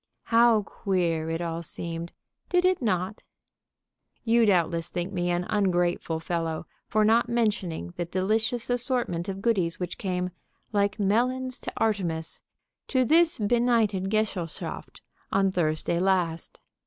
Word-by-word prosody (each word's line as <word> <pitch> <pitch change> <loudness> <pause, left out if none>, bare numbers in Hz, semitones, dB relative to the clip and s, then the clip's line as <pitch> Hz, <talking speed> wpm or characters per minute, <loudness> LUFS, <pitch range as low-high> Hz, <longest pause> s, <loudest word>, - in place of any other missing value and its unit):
How 230 -2 +6
queer 170 -6 -1
it 165 +1 -2
all 165 -1 -3
seemed! 170 +1 -5 0.4
Did 360 0 +3
it 370 -3 +3
not? 190 -3 -1 1.0
You 230 -1 +4
doubtless 170 -3 +2
think 175 +2 -4
me 175 -1 -1
an 175 0 0
ungrateful 175 -4 +1
fellow 165 -1 -2 0.2
for 215 0 +2
not 230 +2 +3
mentioning 200 - -1
the 175 - -1
delicious 220 +7 0
assortment 240 -8 -1
of 195 0 -5
goodies 185 -8 +1
which 180 -1 -4
came, 180 -2 -2 0.4
like 205 +1 +1
melons 250 +5 +1
to - - -6
Artemis, 175 -7 -1 0.5
to 255 -2 +2
this 330 +4 +4
benighted 225 -3 +2
gesellschaft 210 -6 -3 0.3
on 195 0 +3
Thursday 170 -1 0
last. 180 -3 0
190 Hz, 130 wpm, -27 LUFS, 170-225 Hz, 1.0 s, How